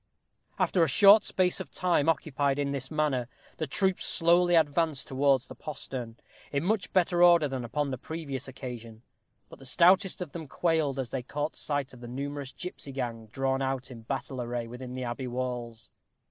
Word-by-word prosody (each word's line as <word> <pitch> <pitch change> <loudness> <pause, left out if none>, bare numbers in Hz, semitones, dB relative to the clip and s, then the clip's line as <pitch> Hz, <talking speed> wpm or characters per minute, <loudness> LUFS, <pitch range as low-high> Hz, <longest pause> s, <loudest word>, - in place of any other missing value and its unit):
After 180 - +2
a 165 - +5
short 205 +4 +7
space 185 0 +1
of 190 - -6
time 170 -4 +1
occupied 145 -3 0
in 140 -1 -1
this 135 -2 -4
manner, 145 -6 0 0.3
the 155 - -2
troop 190 +6 +2
slowly 175 +1 +4
advanced 155 -2 +1
towards 135 -1 +2
the - - -10
postern, 125 -5 -6 0.3
in 140 +1 0
much 200 +1 0
better 175 -1 +2
order 170 -3 +6
than 135 -2 -4
upon 140 +4 -2
the 130 - -4
previous 150 -5 -5
occasion; 120 -3 -8 0.4
but - - -14
the - - -13
stoutest 185 +7 +4
of 180 -6 -5
them 160 -1 -7
quailed 155 -3 0
as 130 -3 -3
they 135 - -2
caught 145 +4 -4
sight 145 -3 -2
of 125 - -13
the 120 - -9
numerous 140 +2 -5
gipsy 180 -5 -7
gang 120 -4 -4
drawn 135 +4 -1
out 130 -1 -2
in 115 -2 -9
battle 130 +2 -4
array 120 0 -3
within 125 +2 -8
the 130 0 -4
abbey 125 +2 -4
walls. 120 -3 -5
140 Hz, 185 wpm, -29 LUFS, 125-165 Hz, 0.4 s, short